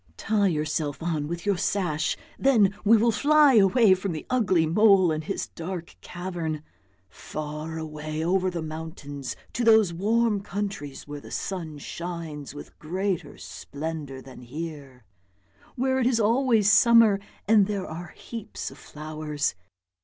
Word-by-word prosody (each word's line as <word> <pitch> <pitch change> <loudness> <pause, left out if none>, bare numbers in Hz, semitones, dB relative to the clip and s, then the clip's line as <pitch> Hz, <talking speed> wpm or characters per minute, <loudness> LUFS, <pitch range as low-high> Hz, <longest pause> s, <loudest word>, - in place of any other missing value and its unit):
Tie 210 -2 +1
yourself 155 -3 -2
on 155 -4 -1
with 170 +3 -5
your 200 -2 +2
sash, 155 -7 0 0.2
then 220 -8 +4
we 220 +2 +6
will 230 +2 +3
fly 295 +3 +5
away 215 0 +6
from 185 -1 -2
the 155 - -6
ugly 190 -10 +3
mole 190 +1 +5
and 155 0 -2
his - - -3
dark 170 0 -6
cavern, 175 -4 -4 0.4
far 150 - -6
away 155 0 -4
over 185 +1 +2
the 170 -3 -4
mountains 155 -4 -6 0.2
to 240 - -1
those 220 -6 +5
warm 215 +3 +1
countries 195 -10 -5
where 145 0 -7
the - - -12
sun 165 -6 -4
shines 160 -2 -6
with 145 - -11
greater 185 +3 -3
splendour 145 -3 -6
than 130 -2 -12
here, 140 -1 -8 0.7
where 260 +1 +1
it 245 - +2
is 245 -3 +2
always 225 -1 +3
summer 225 -1 +6 0.3
and 210 -2 +5
there 200 -3 -2
are 170 +2 -7
heaps 225 -2 -7
of - - -14
flowers. 155 -1 -3
175 Hz, 145 wpm, -26 LUFS, 155-210 Hz, 0.7 s, we